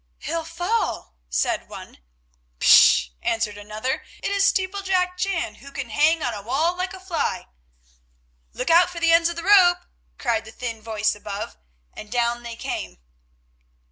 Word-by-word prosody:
"He'll 330 0 -4
fall," 350 - -2 0.2
said - - -1
one. - - -11 0.6
"Pish!" 60 0 +6
answered 225 -2 -1
another, 215 +5 -4 0.2
"it - - -1
is 400 0 +2
steeplejack 375 -1 -1
Jan, 365 - -1
who 280 - -12
can 275 -4 -6
hang 310 +6 +3
on 240 - -1
a 205 - -6
wall 290 - 0
like 370 +1 -4
a - - -11
fly." 365 -3 -2 1.1
"Look - - -2
out 345 +2 +6
for 350 -1 -7
the 335 0 +3
ends 335 0 +5
of 340 - -5
the 335 - -6
rope," 360 -2 +5 0.3
cried 230 -3 -1
the 220 - -10
thin 230 -2 -6
voice 215 -1 0
above, 205 0 -6 0.4
and 215 - -10
down 240 0 0
they 235 -1 -7
came. - - -5
310 Hz, 160 wpm, -23 LUFS, 225-360 Hz, 1.1 s, Pish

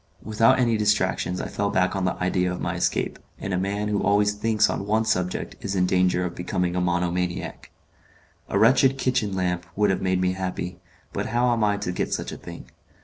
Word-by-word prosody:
Without 110 +2 +3
any 120 -3 +2
distractions 105 -3 +1
I - - -3
fell 100 0 -1
back 90 0 +1
on 95 -1 -1
the 90 - 0
idea 90 0 0
of 90 - -4
my - - -2
escape, - - -1 0.2
and 95 - -4
a - - +1
man 100 +2 -1
who 105 -1 0
always 105 0 +3
thinks 105 0 +2
on 100 - -3
one 110 +1 +2
subject 90 -4 -1
is 100 -1 -2
in 90 -1 +3
danger 90 0 +2
of 85 - -4
becoming 90 0 -2
a 90 - +1
monomaniac. 90 0 -2 0.8
A - - 0
wretched 130 +3 +5
kitchen 125 -7 0
lamp 90 -2 -1
would 105 -1 +3
have 95 - -1
made 95 -1 +1
me 90 0 +2
happy, 90 -1 -4 0.3
but - - -2
how 120 +1 +2
am 115 -2 0
I 105 -1 +2
to 100 -3 -3
get 90 - -1
such - - -5
a - - -7
thing? - - -11
95 Hz, 210 wpm, -24 LUFS, 90-105 Hz, 0.8 s, wretched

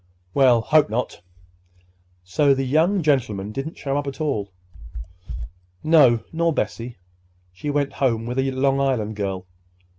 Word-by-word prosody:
"We'll 125 -4 +5
hope 155 +3 +3
not. 115 -2 -3 1.0
So 140 +10 +2
the 135 0 -1
young 165 +8 +2
gentleman 110 -9 0
didn't 135 +7 -5
show 140 -1 -2
up 145 0 -2
at 140 - -6
all?" 110 -11 -2 1.3
"No, 135 -8 +5
nor 165 +1 +1
Bessie. 120 -5 -3 0.6
She 145 +11 -5
went 145 -1 0
home 115 -5 0
with 125 +2 -3
a 135 0 +1
Long 135 +1 +1
Island 120 -6 0
girl. 95 -2 -3
135 Hz, 140 wpm, -22 LUFS, 115-145 Hz, 1.3 s, We'll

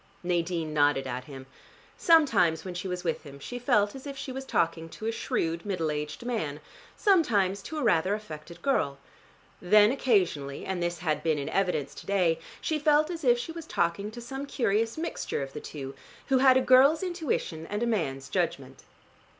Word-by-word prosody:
Nadine 170 -2 -1
nodded 145 -2 +3
at 125 0 -4
him. 135 -2 -10 0.5
Sometimes 230 - +4
when 185 - -5
she 180 +2 -4
was 180 -1 -4
with 165 -2 -1
him 140 -2 -11
she 245 - -7
felt 205 -4 +2
as 270 +1 -9
if 275 -1 -6
she 270 -1 -5
was 265 +1 -6
talking 165 -6 0
to 215 - -9
a 225 - +1
shrewd 170 -6 -2
middle 180 -6 -1
aged 150 +8 -5
man, 160 -12 -2 0.4
sometimes 210 - +3
to 315 - -7
a 300 - -1
rather 190 -2 +3
affected 165 -5 -10
girl. 140 - +1 0.6
Then 210 +4 +6
occasionally, 180 - 0
and 190 -2 -3
this 175 0 -1
had 155 -3 -1
been 160 -1 +1
in 140 0 -3
evidence 180 -8 0
to - - -12
day, 180 -5 +2 0.2
she 310 -1 -1
felt 300 +2 +3
as 330 -2 -6
if 245 -2 +5
she 245 +7 -5
was 325 -1 -8
talking 170 - 0
to 240 +2 -9
some 270 +4 -6
curious 225 -2 0
mixture 320 - -3
of 135 0 -8
the 150 - -6
two, 135 -3 -7 0.4
who 265 -1 +4
had 260 -1 +6
a - - +3
girl's 270 +6 +5
intuition 310 - -2
and 210 +3 -2
a - - +2
man's 140 - -1
judgment. - - -3
195 Hz, 190 wpm, -28 LUFS, 160-255 Hz, 0.6 s, Then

